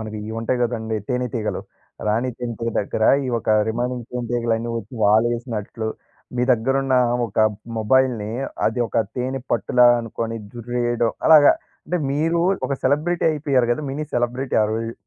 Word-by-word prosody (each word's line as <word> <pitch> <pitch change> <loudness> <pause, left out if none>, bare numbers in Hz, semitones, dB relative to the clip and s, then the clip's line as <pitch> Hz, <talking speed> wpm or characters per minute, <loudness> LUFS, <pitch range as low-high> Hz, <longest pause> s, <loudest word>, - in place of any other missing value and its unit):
మనకియ్యి 110 0 -6
ఉంటాయి 125 +2 -1
గదండీ 110 -2 -2
తేనేతీగలు. 125 -3 -2 0.5
రాణి 115 +4 +1
జంతువు 115 -1 -3
దగ్గర 110 +2 -1 0.2
ఈ - - -3
ఒక 110 - -9 0.2
రిమెయినింగ్ 120 +1 -2
తేనెటీగలన్నీ 120 -1 -1
ఒచ్చి 110 +3 -10
వాలేసినట్లు, 110 0 0 0.5
మీ 125 - +1
దగ్గరున్న 135 +3 +1 0.3
ఒక 110 - -7 0.4
మొబైల్‌ని 115 -2 +2 0.4
అది 115 +3 0
ఒక - - -5 0.2
తేనే 130 +1 -2
పట్టులా 125 +1 +4
అనుకొని 115 0 -4 0.2
జుర్రేయడం 120 0 -1 0.2
అలాగా, 150 -2 +8 0.3
అంటే 175 +3 -1
మీరు 165 +3 +1 0.3
ఒక 140 - -3
సెలబ్రిటీ 155 +6 +1
అయిపోయారు 140 -5 +1
కదా! 155 - -3
మినీ 150 +3 -3
సెలబ్రిటీ 125 +2 -1
ఆ - - +3
రోజు. 115 +1 -3
120 Hz, 135 wpm, -22 LUFS, 115-130 Hz, 0.5 s, అలాగా